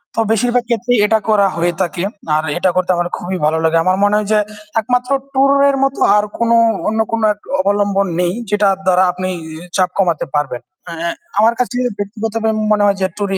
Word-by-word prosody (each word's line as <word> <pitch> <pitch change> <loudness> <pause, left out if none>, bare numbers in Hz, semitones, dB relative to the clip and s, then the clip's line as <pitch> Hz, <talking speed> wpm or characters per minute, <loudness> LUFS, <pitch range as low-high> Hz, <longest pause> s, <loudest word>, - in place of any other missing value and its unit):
তো - - -1
বেশিরভাগ 240 +2 +1
ক্ষেত্রেই 240 +1 +1
এটা 220 +1 +2
করা 205 -2 +4
হয়ে 170 +1 0
থাকে। 175 -1 -2 0.3
আর 155 - +1
এটা 185 +1 +2
করতে 185 0 +1
আমার 175 0 -1
খুবই 185 +1 -4
ভালো 155 +1 +1
লাগে। 160 +1 +2
আমার 185 +1 +1
মনে 205 +1 +3
হয় 210 -1 -2
যে 215 - +4 0.4
একমাত্র 250 +3 -1 0.2
টুর 275 +1 +3 0.2
এর 275 - +1
মত 275 0 +1 0.2
আর 205 - +2
কোন 235 0 0 0.4
অন্য 220 +1 -1
কোন 230 - -1
এক 205 - -24 0.2
অবলম্বন 200 0 +1
নেই 180 0 +1 0.2
যেটার 205 -2 +2
দ্বারা 185 0 +4
আপনি 185 +1 -4 0.5
চাপ 185 -1 +2
কমাতে 175 -5 +1
পারবেন। 140 -4 -2 0.3
এ - - -6
এহ 170 +1 -3 0.3
আমার 225 +2 +4
কাছে 250 0 -1 0.2
ব্যক্তিগতভাবে 220 +2 -3 0.2
মনে 210 -1 +3
হয় 200 -1 +2
যে 190 - +2
টুর-ই 200 -2 -1
200 Hz, 195 wpm, -16 LUFS, 180-225 Hz, 0.5 s, করা